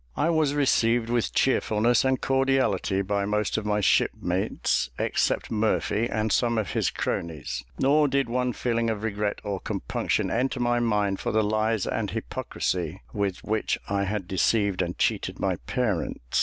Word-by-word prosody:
I 165 Hz, -, +2 dB
was 155 Hz, -3 st, +2 dB
received 120 Hz, -4 st, +2 dB
with 120 Hz, -2 st, +1 dB
cheerfulness 120 Hz, -2 st, +2 dB
and 130 Hz, -1 st, +1 dB
cordiality 135 Hz, -8 st, +1 dB
by 100 Hz, +1 st, -1 dB
most 105 Hz, 0 st, 0 dB
of 110 Hz, -1 st, -2 dB
my 105 Hz, 0 st, +1 dB
shipmates, 95 Hz, -, +1 dB
except -, -, 0 dB
Murphy 110 Hz, +1 st, +1 dB
and 110 Hz, 0 st, -1 dB
some 120 Hz, +1 st, +2 dB
of 105 Hz, -7 st, -1 dB
his -, -, +1 dB
cronies; 70 Hz, -7 st, -3 dB, 0.2 s
nor 145 Hz, +2 st, +4 dB
did 140 Hz, -1 st, +1 dB
one 125 Hz, +1 st, 0 dB
feeling 115 Hz, -1 st, 0 dB
of 110 Hz, -1 st, -3 dB
regret 105 Hz, -1 st, -1 dB
or 100 Hz, -2 st, -3 dB
compunction -, -, -2 dB
enter 130 Hz, +2 st, 0 dB
my 120 Hz, 0 st, +2 dB
mind 105 Hz, -4 st, +1 dB
for -, -, -2 dB
the 110 Hz, 0 st, +2 dB
lies 110 Hz, 0 st, +1 dB
and -, -, -2 dB
hypocrisy 90 Hz, +1 st, -3 dB
with 100 Hz, -3 st, -2 dB
which 110 Hz, 0 st, 0 dB
I 100 Hz, 0 st, 0 dB
had 100 Hz, -2 st, -3 dB
deceived 100 Hz, 0 st, +1 dB
and 85 Hz, -1 st, -3 dB
cheated -, -, 0 dB
my -, -, 0 dB
parents. 105 Hz, -, -1 dB
110 Hz, 160 wpm, -26 LUFS, 100-120 Hz, 0.2 s, nor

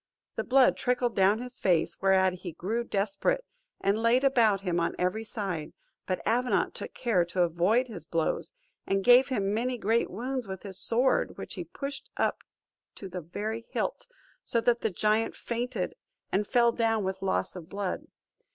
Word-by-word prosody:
The -, -, -1 dB
blood 260 Hz, 0 st, +4 dB
trickled 245 Hz, -1 st, 0 dB
down 195 Hz, +2 st, +4 dB
his 250 Hz, +1 st, -7 dB
face, 175 Hz, -4 st, +1 dB
whereat 190 Hz, -1 st, +3 dB
he 175 Hz, -3 st, -6 dB
grew 225 Hz, +9 st, -2 dB
desperate, 215 Hz, -, 0 dB, 0.3 s
and 200 Hz, +3 st, +1 dB
laid 235 Hz, +3 st, +3 dB
about 230 Hz, -8 st, +4 dB
him 175 Hz, -3 st, 0 dB
on 170 Hz, -, 0 dB
every 185 Hz, +5 st, 0 dB
side; 190 Hz, -8 st, -4 dB, 0.3 s
but 185 Hz, -, -2 dB
Avenant 245 Hz, +2 st, +1 dB
took -, -, -8 dB
care 225 Hz, -8 st, +2 dB
to 175 Hz, +1 st, +1 dB
avoid 180 Hz, +9 st, +2 dB
his 180 Hz, -9 st, -9 dB
blows, 165 Hz, -2 st, -1 dB, 0.4 s
and 195 Hz, 0 st, +1 dB
gave 245 Hz, +3 st, +7 dB
him 205 Hz, -6 st, 0 dB
many 245 Hz, +3 st, -1 dB
great 225 Hz, +1 st, +1 dB
wounds 250 Hz, +3 st, -3 dB
with 190 Hz, -1 st, -6 dB
his 195 Hz, -2 st, -2 dB
sword, 240 Hz, +6 st, +2 dB
which -, -, -6 dB
he -, -, -5 dB
pushed 275 Hz, -1 st, -6 dB
up -, -, +1 dB, 0.6 s
to 195 Hz, -, -7 dB
the 180 Hz, 0 st, -5 dB
very 215 Hz, +7 st, -5 dB
hilt; -, -, -3 dB, 0.4 s
so 235 Hz, -, 0 dB
that 240 Hz, 0 st, +2 dB
the 220 Hz, -, +1 dB
giant 215 Hz, +4 st, +1 dB
fainted, 245 Hz, +2 st, -3 dB, 0.4 s
and 205 Hz, +2 st, +1 dB
fell 235 Hz, -1 st, +4 dB
down 225 Hz, -2 st, +1 dB
with 190 Hz, 0 st, -3 dB
loss 190 Hz, -1 st, -1 dB
of 170 Hz, -3 st, -9 dB
blood. 200 Hz, -2 st, -3 dB
215 Hz, 175 wpm, -29 LUFS, 190-240 Hz, 0.6 s, gave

